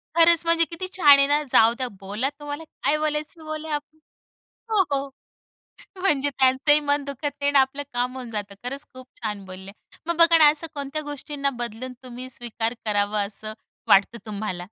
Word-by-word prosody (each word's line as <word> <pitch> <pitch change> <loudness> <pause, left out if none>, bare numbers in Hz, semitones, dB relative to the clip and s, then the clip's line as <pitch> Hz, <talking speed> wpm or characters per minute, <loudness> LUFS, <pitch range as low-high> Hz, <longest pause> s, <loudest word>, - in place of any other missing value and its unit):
खरंच, 335 -1 +6
म्हणजे 335 0 +4
किती 355 +3 -6
छान 290 -6 +8
आहे 275 - +5
ना, 290 +1 +2
जाऊ 225 +1 +6
द्या 255 -1 -2
बोला 205 +7 -2
तुम्हाला 290 +1 -6 0.2
काय 300 - +3
बोलायचं 305 +1 -2
ते - - -12
बोला 310 -1 -3 0.9
हो, 425 -3 +4
हो. 275 0 -1 0.9
म्हणजे 290 -7 +2
त्यांचंही 270 +2 +3
मन 285 -1 0
दुखत 280 +1 -7 0.2
नाही 285 - +1
आणि 285 - +3
आपलं 265 +2 0
काम 245 +1 -1
होऊन 250 -2 -7
जातं 205 -2 -5
खरंच, 275 +3 -5
खूप 255 0 -11 0.2
छान 210 -3 -4
बोलले. 190 +1 -10 0.4
मग 340 -1 -1
बघा 335 0 +7
ना, 305 -2 +8
असं 310 +2 -5
कोणत्या 285 +1 -4
गोष्टींना 290 -1 -3
बदलून 240 +2 -5
तुम्ही 255 0 -8
स्वीकार 235 -2 -3
करावं, 205 -1 +1
असं 215 +1 -6 0.3
वाटतं 200 +4 +4
तुम्हाला? 210 -3 -4
275 Hz, 175 wpm, -24 LUFS, 230-300 Hz, 0.9 s, छान